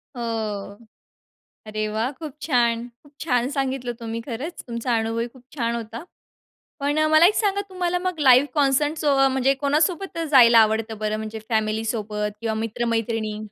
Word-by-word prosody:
हो, 215 -4 -4 0.9
अरे 215 0 -2
वाह! 220 +4 -1
खूप 295 0 -9
छान. 240 -5 +1 0.2
खूप 290 - -20
छान 250 -5 +1
सांगितलं 265 -3 -2
तुम्ही, 230 0 -5
खरंच, 270 +8 -6
तुमचा 235 0 -1
अनुभवही 225 +1 -1
खूप 245 +1 -19
छान 235 -4 -1
होता. 230 +4 -6 0.8
पण 290 +2 0
मला 315 +2 +7
एक 410 - +3
सांगा, 405 -2 +1
तुम्हाला 360 -2 -1
मग 365 -2 -3
लाईव्ह 260 -1 +6
कॉन्सर्ट 290 +1 +2
सो 290 -3 +2
म्हणजे 265 +1 +2
कोणासोबत 310 +7 0
जायला 240 -4 +7
आवडतं 220 0 +2
बरं? 215 0 -1
म्हणजे 220 0 -6
फॅमिली 220 -1 0
सोबत 210 -2 -2
किंवा 225 -1 -2
मित्र-मैत्रिणी? 225 -1 -2
235 Hz, 150 wpm, -23 LUFS, 225-285 Hz, 0.9 s, मला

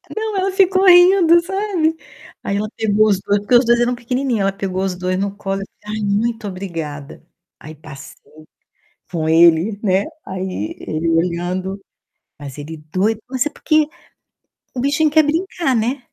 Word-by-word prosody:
Não, 435 -2 -3
ela 380 +1 0
ficou 380 0 +3
rindo, 355 -1 +7
sabe. 365 -4 -1 0.5
Aí 200 - -2
ela 215 +1 -2
pegou 215 -1 +2
os 200 -3 +2
2, 200 +1 0
porque 205 +5 +1
os 240 0 +5
2 235 0 +3
eram 240 +1 +1
pequenininho, 250 -1 -2
ela 195 0 +1
pegou 190 -1 -3
os 190 -2 -2
2 185 +1 -2
no 200 0 -3
colo 195 -1 -4
e - - -5
disse: - - -35
"Ai, 215 0 -4
muito 220 +2 -1
obrigada". 165 -7 -7 0.4
Aí 155 +1 -11
passei 145 -3 -12 1.0
com 160 -3 -2
ele, 170 +5 +4
né. 195 -2 +2 0.2
Aí 185 - -5
ele 160 +1 -3
olhando. 180 +3 -1 0.6
Mas 145 -1 -9
ele 155 +2 -8
doido 215 +4 0
mas 260 +2 -1
é - - -1
porque 310 0 +1 0.9
o 250 - -3
bichinho 290 +3 +1
quer 315 +1 +5
brincar, 325 -2 -1
né? 245 +4 -1
205 Hz, 165 wpm, -18 LUFS, 185-285 Hz, 1.0 s, rindo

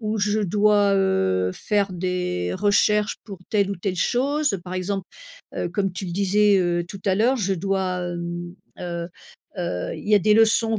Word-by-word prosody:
ou 215 0 -2
je 210 +1 +1
dois, 205 +1 +3
heu, 95 - +1
faire 200 -2 0
des 180 - -2
recherches 210 0 +2
pour 200 -4 -9
telle 200 -2 +2
ou 200 - -2
telle 185 +1 -3
chose. 275 - +1
Par 180 +1 -6
exemple, 190 +1 -2 0.5
heu, - - -2
comme 195 +1 -1
tu 190 - -5
le 175 - -5
disais, 200 +2 +3
heu, 175 -1 0
tout 195 +1 -8
à 190 - +3
l'heure 245 +5 +3
je 195 -4 0
dois, 185 0 -1
hem, 175 0 -5 0.3
heu, 170 -1 -4 0.5
heu, 90 - -3
il - - -9
y 210 - +5
a 205 - +5
des 210 +4 +3
leçons 225 0 +3
195 Hz, 185 wpm, -23 LUFS, 175-210 Hz, 0.5 s, y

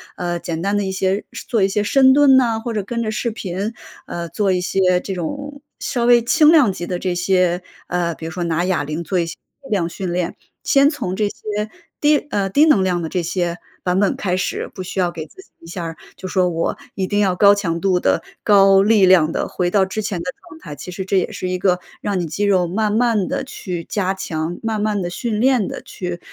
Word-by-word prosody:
呃， 175 -1 -3
简 165 -1 -4
单 200 +1 0
的 205 - +1
一 190 - -2
些 190 +1 0 0.2
做 225 -5 +1
一 190 - +4
些 205 +1 0
深 265 +4 +5
蹲 270 -1 +6
啊， 230 -3 0
或 230 0 -4
者 210 - -1
跟 235 +4 -3
着 215 - -2
视 235 +2 -1
频， 205 0 -4 0.3
呃， 170 0 -4
做 195 +4 0
一 180 - +1
些 180 0 +2
这 195 - -5
种 280 - -5 0.2
稍 240 -2 -1
微 240 -1 +5
轻 305 +5 +5
量 280 - +5
级 175 -1 -6
的 180 - -2
这 180 0 -2
些 180 0 +1 0.3
呃， 175 -2 -1
比 160 - -9
如 165 - -5
说 175 +1 -3
拿 170 +1 0
哑 185 -5 0
铃 155 +3 -4
做 180 +2 -1
一 170 - 0
些 165 - -6 0.3
适 270 - -13
量 185 -6 +1
训 180 +1 -5
练。 175 -1 -2 0.3
先 280 0 +4
从 240 - -3
这 210 +1 0
些 210 +1 -4 0.3
低 295 0 +5
呃， 195 -1 0
低 290 +10 +5
能 215 -12 +4
量 180 -2 0
的 160 - -2
这 180 +1 -1
些 175 0 -1 0.3
版 180 +1 +1
本 200 - +2
开 180 -2 -1
始， 185 - -2
不 185 - -5
需 190 - -5
要 175 -1 +1
给 160 -2 -6
自 380 - -15
己 - - -21
一 - - -15
下 175 +1 -5
儿， 165 0 -5 0.2
就 190 - -6
说 185 -1 +1
我 165 -1 -2 0.2
一 190 -1 -1
定 205 0 0
要 185 -3 +2
高 205 0 +7
强 170 -5 -2
度 185 -1 +2
地、 - - +2 0.2
高 195 -2 +6
力 210 -2 +5
量 170 -4 +5
地 - - -2
回 175 -1 -1
到 195 -2 +3
之 205 +3 -4
前 205 -4 -3
的 170 - -4 0.2
状 315 - -13
态。 150 - -9
其 180 - -8
实 185 +1 -5
这 195 - +1
也 - - -2
是 185 - -4
一 180 0 -1
个 180 -1 +2 0.2
让 200 -3 -1
你 175 - -1
肌 165 +6 -3
肉 185 -3 +3
慢 210 +4 0
慢 220 -3 +1
地 265 - -2
去 180 -9 -6
加 190 -2 -1
强， 165 -2 -4
慢 220 -2 -2
慢 210 -2 0
地 175 - -2
训 215 +3 -3
练 250 -4 +2
地 - - -6
去 180 -2 -6
190 Hz, 265 characters per minute, -20 LUFS, 175-215 Hz, 0.3 s, 高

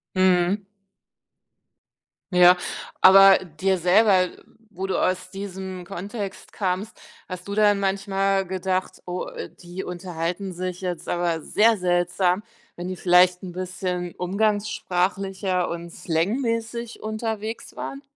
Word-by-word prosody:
Mhm. 185 +1 +3 1.7
Ja, 180 0 +7 0.4
aber 195 0 +9
dir 185 +2 -1
selber 185 +1 +4 0.5
wo 190 +1 -2
du 190 - 0
aus 185 0 0
diesem 190 -2 -6
Kontext 195 +1 -6
kamst, 195 +2 -3 0.3
hast 185 0 -7
du 200 - -4
dann 205 -1 +4
manchmal 195 0 0
gedacht: 185 0 -2
„Oh, 180 0 -4
äh, - - -7
die 175 +2 -8
unterhalten 180 +1 -4
sich 180 +1 -5
jetzt 180 -2 -4
aber 175 -2 0
sehr 220 +7 +3
seltsam.“ 180 +1 +1 0.3
wenn 175 +1 -5
die 185 - -5
vielleicht 180 0 +4
'n 180 -2 -7
bisschen 180 -1 -4
umgangssprachlicher 195 -1 0
und 170 0 -6
slangmäßig 230 +6 -2
unterwegs 220 0 -4
waren? 275 - -5
185 Hz, 115 wpm, -24 LUFS, 180-200 Hz, 1.7 s, aber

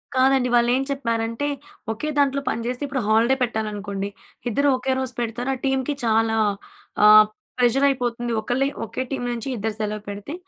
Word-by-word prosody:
కాదండి. 260 -1 +3
వాళ్ళు 240 0 +4
ఏం 270 - +1
చెప్పారంటే, 230 0 -1 0.4
ఒకే 265 +8 -3
దాంట్లో 280 -1 +2
పనిచేస్తే 245 +4 -3
ఇప్పుడు 270 -2 -2
హాలిడే 230 +4 +4
పెట్టాలనుకోండి. 205 -3 -3 0.4
ఇద్దరు 280 +6 +1
ఒకే 260 +1 -2
రోజు 260 -2 -3
పెడతారు. 240 +3 -2
ఆ - - -8
టీమ్‌కి 265 +1 0
చాలా 225 0 +2 0.7
ఆహ్, 215 0 +9 0.3
ప్రెజర్ 250 +3 +3
అయిపోతుంది. 240 -2 -2
ఒకళ్ళే 255 +5 0 0.2
ఒకే 255 - -5
టీమ్ 245 -2 -2
నుంచి 240 +3 -4
ఇద్దరు 215 +1 -2
సెలవు 210 0 -2
పెడితే, 205 +9 -6
240 Hz, 155 wpm, -23 LUFS, 220-265 Hz, 0.7 s, ఆహ్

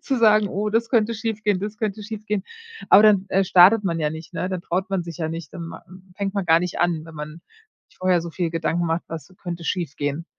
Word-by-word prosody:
zu 265 -3 -1
sagen: 215 -2 +5
„Oh, 210 +3 -2
das 225 +2 0
könnte 230 -2 +2
schiefgehen, 215 -3 -1
das 210 +1 -4
könnte 215 -1 -3
schiefgehen.“ 210 -2 -4 0.5
Aber 205 +2 +8
dann, 200 -2 +5
äh, 195 +1 +2
startet 190 +4 +6
man 170 -3 -1
ja 150 -1 0
nicht, 160 +1 -9
ne? 185 - -2
Da 185 -1 -2
traut 185 +3 -3
man 185 -3 -1
sich 170 -2 -8
ja 160 -1 -2
nicht, 165 -2 -7
dann 175 -3 -7
ma - - -10 0.3
fängt 200 0 -3
man 200 -2 -1
gar 165 0 +5
nicht 180 0 -3
an, 170 -3 +1
wenn 165 - -12
man 155 +2 -8 0.5
sich - - -27
vorher 185 -2 +2
so 170 0 -6
viel 170 -1 -2
Gedanken 165 +1 -1
macht: 165 +1 -1
Was 165 +3 -8
könnte 175 -1 -5
schiefgehen? 160 -3 -3
185 Hz, 235 wpm, -23 LUFS, 165-210 Hz, 0.5 s, Aber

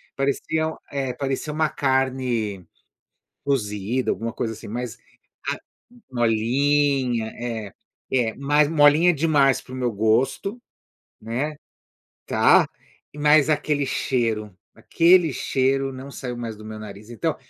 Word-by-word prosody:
parecia, 155 +3 -1
eh, 135 -3 -2
parecia 135 +3 -3
uma 155 0 +1
carne, 130 - -1 0.8
cozida 115 -2 -1
alguma 115 0 -4
coisa, 115 -3 -3
assim, 110 - -11
mas 120 +1 -4 0.6
a - - -5 0.5
molinha, 125 +1 +2
é, 115 -4 -5 0.4
é, 120 -4 +1
mas 145 +2 +2
molinha 155 +3 +5
demais 145 -3 +3
para 130 - -14
o - - -5
meu 125 -2 -1
gosto, 120 - 0 0.6
né. 130 +7 -3 0.7
Tá. - - +5 0.5
Mas 150 0 +4
aquele 150 -1 +1
cheiro, 110 -7 -1 0.2
aquele 170 -2 +4
cheiro 135 +1 0
não 130 +2 -9
saiu 125 -3 -6
mais 115 -2 -5
do 110 - -12
meu 110 0 -7
nariz, 105 +1 -10
então, 115 -4 -2
130 Hz, 120 wpm, -23 LUFS, 115-145 Hz, 0.8 s, molinha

